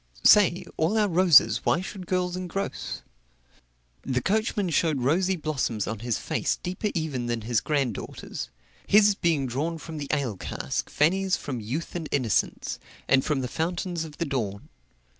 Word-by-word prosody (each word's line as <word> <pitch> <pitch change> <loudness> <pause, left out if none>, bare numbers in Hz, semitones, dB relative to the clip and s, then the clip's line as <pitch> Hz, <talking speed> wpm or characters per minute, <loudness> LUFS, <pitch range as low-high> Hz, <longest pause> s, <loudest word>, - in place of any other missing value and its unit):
"Say, 185 -3 +6
all 170 +8 +1
our 210 -1 +3
roses 165 - +5
why 175 - +2
should 185 -1 -7
girls 180 -1 0
engross?" 185 +2 -4 1.0
The 130 -2 -1
coachman 205 - 0
showed 155 -3 +1
rosy 180 +8 +2
blossoms 140 - -2
on 110 -1 -4
his 115 -1 -1
face - - -1
deeper 185 +4 -2
even 145 -7 -2
than 120 -1 -1
his 115 0 0
granddaughter's, 140 -8 -3 0.4
his 210 0 +6
being 165 -7 +1
drawn 145 +7 -2
from 160 0 -7
the 145 - -4
ale 135 -9 -1
cask, - - -3
Fanny's 190 +5 +2
from 130 -4 -5
youth 125 +10 -4
and 165 -3 -4
innocence, 125 -7 0 0.3
and 135 0 +4
from 145 -3 0
the 125 - -2
fountains 170 +3 -2
of 155 -2 -10
the 170 - -1
dawn. 110 -9 -3
160 Hz, 160 wpm, -26 LUFS, 130-180 Hz, 1.0 s, Say